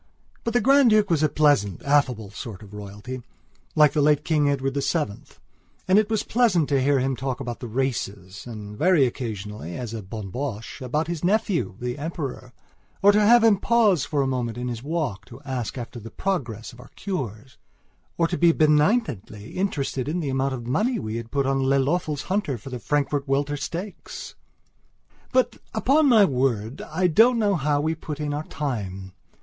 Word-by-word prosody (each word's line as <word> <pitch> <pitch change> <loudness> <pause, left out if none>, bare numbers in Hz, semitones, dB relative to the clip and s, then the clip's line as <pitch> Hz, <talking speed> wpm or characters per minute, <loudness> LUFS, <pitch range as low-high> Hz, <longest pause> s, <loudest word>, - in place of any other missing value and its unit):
But 230 0 -2
the 245 - +4
Grand 270 +2 +5
Duke 210 -3 +3
was 160 -3 +2
a 155 - +3
pleasant, 140 - +2
affable 130 -8 +1
sort 110 -1 -8
of 100 0 -14
royalty, 105 +5 -7 0.5
like 150 -1 +5
the 150 - +2
late 150 0 +3
King 150 -3 +2
Edward 135 -1 -1
VII, 140 -5 -1 0.6
and 190 +3 +6
it 215 0 0
was 220 -2 0
pleasant 215 - +2
to 140 -2 +2
hear 140 +1 +3
him 135 0 0
talk 130 0 -3
about 120 -3 -5
the 120 - -6
races 105 -6 -3
and, 105 -3 -8
very 160 - +4
occasionally, 105 - -5
as 120 -3 -5
a 115 - -4
bonne 100 0 -7
bouche, 125 0 -5
about 150 +5 -1
his 170 -1 -4
nephew, 200 - +1
the 125 +3 -4
Emperor; 145 -5 -5 0.5
or 200 - +8
to 210 +1 +3
have 230 +3 +6
him 220 -3 +5
pause 210 - +3
for 145 -3 0
a - - 0
moment 120 -3 -2
in 125 0 -3
his 115 -2 -5
walk 140 - -2
to 120 +1 -12
ask 130 -3 -4
after 120 0 -6
the 115 +1 -9
progress 120 - -3
of 120 - -15
our 125 - -13
cures 130 - -5 0.6
or 165 - +3
to 175 - -3
be 170 -1 +6
benignantly 150 - +1
interested 140 -8 -2
in 170 +3 -1
the 150 -5 -2
amount 135 0 0
of 120 -2 -7
money 215 - +1
we 110 +1 -4
had 115 0 -6
put 140 +1 0
on 135 0 +1
Lelöffel's 140 +3 +1
hunter 185 -9 -1
for 130 +5 -10
the 125 - -4
Frankfurt 145 +3 -1
Welter 140 +2 0
Stakes. 170 +8 -6 1.0
But 255 0 +2 0.2
upon 280 +7 +3
my 220 -5 +7
word, 125 - -1
I 175 +4 -2
don't 225 +9 +5
know 210 -3 +2
how 145 -4 +1
we 155 +2 0
put 155 -2 -7
in 150 -1 -2
our 150 +2 -3
time. 95 -10 -4
140 Hz, 190 wpm, -24 LUFS, 120-170 Hz, 1.0 s, or